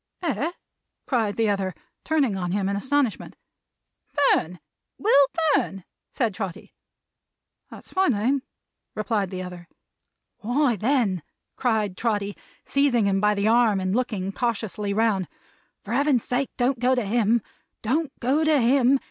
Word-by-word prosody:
"Eh!" 325 0 -1 0.5
cried 225 -6 0
the 225 -1 +1
other, 195 -3 -1 0.3
turning 285 -10 +1
on 180 -2 -3
him 195 0 0
in 200 - -1
astonishment. 260 +2 -1 0.7
"Fern! 180 - +1 0.4
Will 285 -10 +5 0.3
Fern!" 195 -7 0 0.3
said 230 -6 -1
Trotty. 190 -3 -6 1.0
"That's - - -13
my 380 0 +3
name," 255 +3 +1 0.5
replied 210 -2 -1
the 185 -1 -5
other. 180 -1 -9 0.7
"Why, 245 +3 +1
then," 215 - +1 0.3
cried 220 -6 0
Trotty, 205 -3 -1 0.3
seizing 275 -6 +2
him 195 -1 +1
by 210 0 +3
the 200 +1 0
arm 225 -3 +4
and 185 +1 -1
looking 210 -6 -1
cautiously 215 -3 -2
round, 200 -4 +1 0.6
"for 215 - -5
Heaven's 275 -2 +2
sake 255 +2 -1
don't 250 0 +1
go 255 +2 +3
to 245 -4 -1
him! 225 +1 +2 0.4
Don't 285 +7 0
go 275 +6 +1
to 310 -2 +4
him! 260 +2 +4
225 Hz, 140 wpm, -24 LUFS, 200-265 Hz, 1.0 s, Will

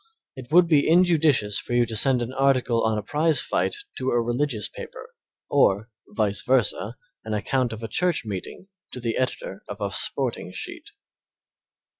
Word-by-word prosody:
It 130 0 -11
would 175 +1 +6
be 150 -3 +3
injudicious 160 - +3
for - - -6
you 120 0 +3
to 115 -1 -6
send 125 +2 +3
an 120 +2 -6
article 130 -3 +2
on 110 -1 +1
a 105 - -3
prize 155 +5 +2
fight - - 0 0.2
to 130 - -1
a 120 - +2
religious 120 -1 0
paper - - -10 0.3
or, 105 +4 +2 0.2
vice 105 -1 0
versa, 120 -3 0 0.3
an 110 -1 -3
account 125 +4 -1
of 110 0 -7
a - - -3
church 175 +4 0
meeting 105 - -7 0.3
to - - -6
the 115 -2 -2
editor 125 -6 -3
of 105 +1 -7
a 100 -1 -2
sporting - - 0
sheet. - - -6
120 Hz, 170 wpm, -24 LUFS, 110-140 Hz, 0.3 s, would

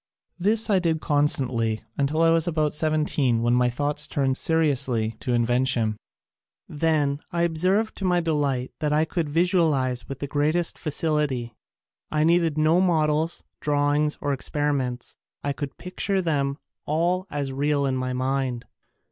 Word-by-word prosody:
This 215 +5 +2
I 200 -3 +3
did 165 -3 0
constantly 130 -8 +1
until 150 +3 +1
I 165 - +5
was 165 +1 +3
about 155 -3 0
seventeen 150 -6 +1
when 120 0 +2
my 125 0 +3
thoughts 145 +4 0
turned 135 -3 0
seri 160 +1 +2
ously 120 -5 0
to 125 - -3
invention. 120 -2 +1 0.7
Then 150 -2 0
I 170 0 0
observed 185 +6 +1
to 195 - -3
my 180 -1 +3
delight 145 -6 -1
that 150 -1 -1
I 155 +1 +3
could 165 -2 -2
visualize 155 -7 +1
with 135 - -5
the 140 - -4
great 145 +3 0
est 175 -1 -1
facility. 150 -6 -1 0.6
I 150 0 +1
needed 165 -1 +2
no 155 +3 +3
models, 160 -2 +1 0.2
drawings 145 +1 +1
or 145 - 0
experiments. 135 -3 -2 0.3
I 145 - -1
could 140 -1 -6
picture 190 +2 -2
them 140 -5 -1 0.3
all 175 +5 0
as 140 -2 -3
real 140 +1 0
in 135 -1 0
my 130 0 -2
mind. 130 -1 -2
150 Hz, 155 wpm, -24 LUFS, 135-165 Hz, 0.7 s, I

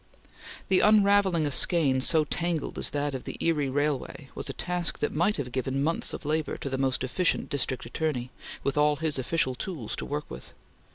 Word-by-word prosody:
The 190 - +5
unravelling 200 -5 +4
a 145 - -1
skein 140 -3 +3
so 155 +3 +4
tangled 170 0 -2
as - - +3
that 145 0 -2
of 130 - -6
the - - -6
Erie 150 -5 +1
Railway 145 0 -2
was - - -5
a - - -3
task 175 +2 -1
that 150 - -2
might 175 +7 +1
have 130 -4 -4
given 130 +2 -1
months 165 +3 0
of - - -7
labor 155 +1 -1
to 140 - -5
the 130 - -1
most 130 -1 +1
efficient 165 +7 0
District 130 -3 -1
Attorney, 125 -1 -3 0.3
with 140 +1 0
all 150 0 +4
his 150 -2 -1
official 130 0 0
tools 130 - -5
to - - -4
work 150 +1 -3
with. - - -10
150 Hz, 195 wpm, -27 LUFS, 135-165 Hz, 0.3 s, The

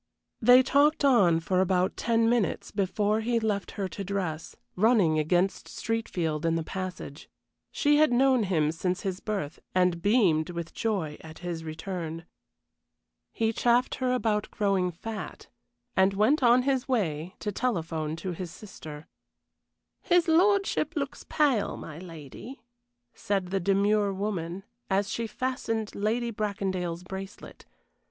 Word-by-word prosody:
They 250 +3 +7
talked 285 +2 +3
on 195 -12 +5
for 185 +2 +1
about 185 0 +1
ten 230 0 +2
minutes 230 -6 0
before 205 +2 0
he 235 +1 +1
left 210 -3 -1
her 195 -2 -1
to 200 - -6
dress, 180 -5 -3 0.2
running 195 -7 +3
against 175 +5 +1
Streatfield 175 -9 -2
in 165 0 +1
the 165 - -1
passage. 180 -5 -6 0.4
She 295 0 +3
had 310 -3 +4
known 260 0 +4
him 155 -5 +1
since 180 +3 -2
his 190 -1 -3
birth, 195 -8 -4 0.2
and 180 -2 +2
beamed 185 -7 +3
with 170 -1 -6
joy 190 -10 -2
at 160 0 -10
his 170 -2 -4
return. 165 0 -5 1.1
He 225 0 0
chaffed 240 +2 +2
her 255 -1 +1
about 220 -4 0
growing 195 -3 +1
fat, 215 +6 -7 0.5
and 190 +1 +3
went 240 +10 +3
on 245 0 +5
his 265 -1 0
way 180 - -1
to 210 - -3
telephone 165 -9 -2
to 180 +3 -5
his 180 0 -5
sister. 160 -6 -10 1.0
"His 350 -2 +3
lordship 390 +4 +2
looks 280 -2 -4
pale, 280 -9 +1
my 155 0 -8
lady," 175 - -10 0.5
said 195 -3 -2
the 195 +1 0
demure 200 +2 +2
woman, 190 -2 -3 0.3
as 195 0 +1
she 230 -1 -2
fastened 225 -3 -3
Lady 230 +3 -1
Bracondale's 190 -5 -3
bracelet. 190 +2 -9
195 Hz, 140 wpm, -28 LUFS, 175-230 Hz, 1.1 s, They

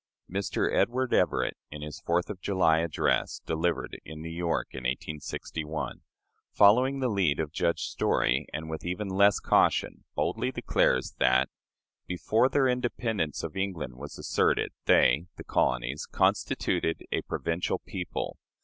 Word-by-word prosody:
Mr. 100 +2 -1
Edward 130 +1 +1
Everett, - - +2
in 75 0 -8
his 75 -1 -7
Fourth 85 +4 0
of 95 -3 -9
July 90 -5 +3
address, 85 -1 0
delivered 80 +2 -1
in 80 -1 -9
New 80 +1 -6
York 85 0 -1
in - - -6
1861, 75 +4 -4 0.5
following 125 +7 +5
the 130 - +2
lead 95 -10 +1
of 80 -2 -2
Judge 85 0 0
Story, 65 +2 +1
and 80 +1 -5
with 80 0 -5
even 90 +4 -3
less 100 +2 +4
caution, - - +2
boldly - - 0
declares 65 - +1
that, 65 +1 +4 0.6
"before 110 +7 +2
their 135 -1 +3
independence 120 - -1
of - - -5
England 95 -9 -3
was 70 +3 -9
asserted, - - +1
they 70 +8 +4
[the - - -8
colonies] 65 +3 0
constituted 80 - 0
a - - 0
provincial 85 +1 -2
people." - - -5
85 Hz, 140 wpm, -28 LUFS, 75-100 Hz, 0.6 s, following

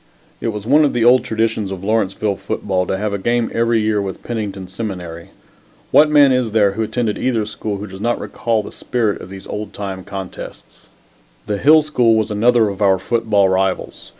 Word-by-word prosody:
It - - -2
was 105 -2 -4
one 145 +6 +5
of 145 - +1
the 120 -1 +1
old 125 +1 +6
traditions 110 -2 -1
of 95 -1 -6
Lawrenceville 105 -1 0
football 95 -1 -2
to 95 - -1
have 105 +1 -2
a 100 - -2
game 120 +3 0
every 115 0 +2
year 105 -1 +1
with 95 -1 -6
Pennington 105 -5 -4
Seminary. 90 -4 -6 0.6
What 150 0 +6
man 145 -2 +6
is 125 -4 0
there 105 -3 +4
who 105 +3 -4
attended 110 -1 -1
either 115 -5 0
school 105 -1 -4
who 100 - -6
does 95 -1 -10
not 120 +2 0
recall 115 -2 -2
the - - -9
spirit 115 -5 -2
of - - -10
those 95 0 -10
old 105 -1 -6
time 95 -2 -5
contests? 95 -2 -9 0.6
The 105 -1 -2
Hill 155 +2 +6
School 125 -7 +2
was 110 0 0
another 115 +1 +3
of 100 +1 -7
our 95 -2 +4
football 110 -3 +1
rivals. 95 0 -1
105 Hz, 200 wpm, -18 LUFS, 95-115 Hz, 0.6 s, old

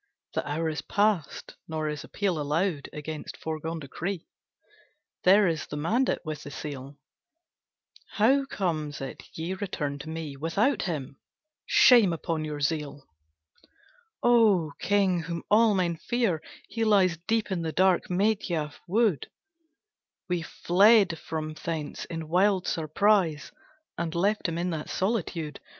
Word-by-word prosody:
The - - -1
hour 160 +3 -1
is 155 -1 -2
past; 205 -6 -1
nor 155 -1 -2
is 150 -1 -4
appeal 185 -6 -1
Allowed 150 +1 -1
against 150 +1 -7
foregone 160 +1 -4
decree; 165 +5 -5 1.0
There 195 +2 +6
is 160 -2 -2
the 150 - -5
mandate 220 - 0
with 155 -2 -5
the 145 - -8
seal! 140 -1 -7 1.2
How 265 +6 +3
comes 160 - -2
it 135 - -6
ye 165 +3 -3
return 160 -8 -3
to 150 - -8
me 160 -3 -5
Without 180 - +1
him? 145 -6 -4 0.5
Shame 230 -8 +6
upon 165 -1 -2
your 150 -1 -5
zeal!" 145 -1 -2 1.2
"O 215 -10 +4
King, 195 -3 +2
whom 170 0 -5
all 215 0 +5
men 175 -3 0
fear, 225 -5 0 0.3
he 230 - -2
lies 195 -6 +4
Deep 225 -2 0
in 180 -3 -1
the 160 -1 -2
dark 185 +1 +2
Medhya 180 -6 0
wood, 205 - +1 1.0
We 180 -2 -1
fled 195 +1 +4
from 155 -1 -4
thence 155 -1 -5
in 165 -2 -6
wild 185 +2 +2
surprise, 165 0 +1 0.5
And 170 -1 -2
left 200 +5 +1
him 165 - -3
in 175 +1 -1
that 155 -2 -4
solitude. 180 -7 -2
170 Hz, 135 wpm, -27 LUFS, 155-200 Hz, 1.2 s, There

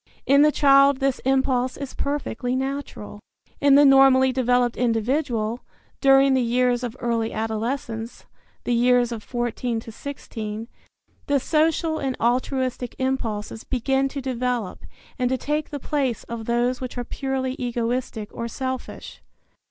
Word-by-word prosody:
In 280 +1 +5
the 300 0 +6
child 275 -1 +5
this 270 -2 0
impulse 260 -1 +1
is 280 -2 -6
perfectly 260 -3 -2
natural. 265 -6 -4 0.4
In 285 -1 +5
the 290 +1 +7
normally 270 -1 +6
developed 245 -1 +1
individual, 235 -1 0 0.4
during 270 0 +5
the 260 - +3
years 245 +1 +1
of 245 0 -5
early 230 -1 -1
adolescence 225 +1 -4 0.4
(the 245 - 0
years 245 0 +3
of 230 -2 -5
14 240 0 -2
to 225 - -10
16) 225 -4 -6 0.6
the 285 -1 +2
social 315 +2 +1
and 265 -2 -2
altruistic 250 +1 -1
impulses 225 -5 -3
begin 270 +2 0
to 280 0 -5
develop 250 -5 -2 0.4
and 250 -1 +1
to 260 - 0
take 300 +4 -2
the 290 - -5
place 270 -4 -1
of 230 -1 -6
those 240 +2 0
which 255 -1 -6
are 245 - -2
purely 260 +1 -3
egoistic 240 -2 -2
or 235 - -4
selfish. 260 +2 -6
255 Hz, 140 wpm, -23 LUFS, 235-270 Hz, 0.6 s, the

